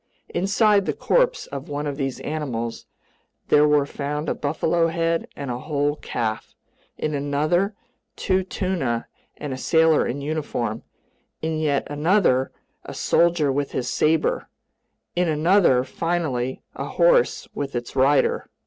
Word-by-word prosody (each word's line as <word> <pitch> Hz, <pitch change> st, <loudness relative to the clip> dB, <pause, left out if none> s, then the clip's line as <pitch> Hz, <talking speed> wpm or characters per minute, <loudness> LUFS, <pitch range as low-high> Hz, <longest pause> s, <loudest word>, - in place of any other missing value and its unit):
Inside 200 Hz, +2 st, +2 dB
the -, -, +1 dB
corpse -, -, +2 dB
of 140 Hz, +1 st, -7 dB
one 145 Hz, +1 st, -3 dB
of 145 Hz, -1 st, -2 dB
these 135 Hz, -2 st, -3 dB
animals 125 Hz, -7 st, -4 dB, 0.6 s
there 150 Hz, 0 st, +6 dB
were 150 Hz, -1 st, +3 dB
found 145 Hz, +2 st, -4 dB
a -, -, +1 dB
buffalo 160 Hz, +3 st, 0 dB
head 165 Hz, 0 st, 0 dB
and 140 Hz, -3 st, -5 dB
a 120 Hz, -, -3 dB
whole 145 Hz, 0 st, -1 dB
calf; 110 Hz, -6 st, -4 dB, 0.4 s
in 155 Hz, -, -2 dB
another, 155 Hz, +8 st, 0 dB, 0.4 s
two 190 Hz, -1 st, +1 dB
tuna 180 Hz, -11 st, -2 dB, 0.3 s
and 145 Hz, -3 st, -5 dB
a 130 Hz, -, -6 dB
sailor 160 Hz, +2 st, +3 dB
in 130 Hz, +4 st, -3 dB
uniform; 140 Hz, -7 st, -3 dB, 0.6 s
in 160 Hz, -1 st, -1 dB
yet 145 Hz, -3 st, +1 dB
another, 145 Hz, -3 st, +2 dB, 0.3 s
a -, -, -8 dB
soldier 170 Hz, -4 st, +2 dB
with 140 Hz, +1 st, -2 dB
his 125 Hz, -1 st, -2 dB
saber; 155 Hz, +1 st, +1 dB, 0.7 s
in 175 Hz, -1 st, +1 dB
another, 155 Hz, -4 st, +4 dB
finally, 135 Hz, -4 st, -2 dB
a -, -, -5 dB
horse -, -, +3 dB
with 140 Hz, -2 st, -4 dB
its 120 Hz, +1 st, -4 dB
rider. 135 Hz, +2 st, +2 dB
150 Hz, 140 wpm, -23 LUFS, 135-170 Hz, 0.7 s, there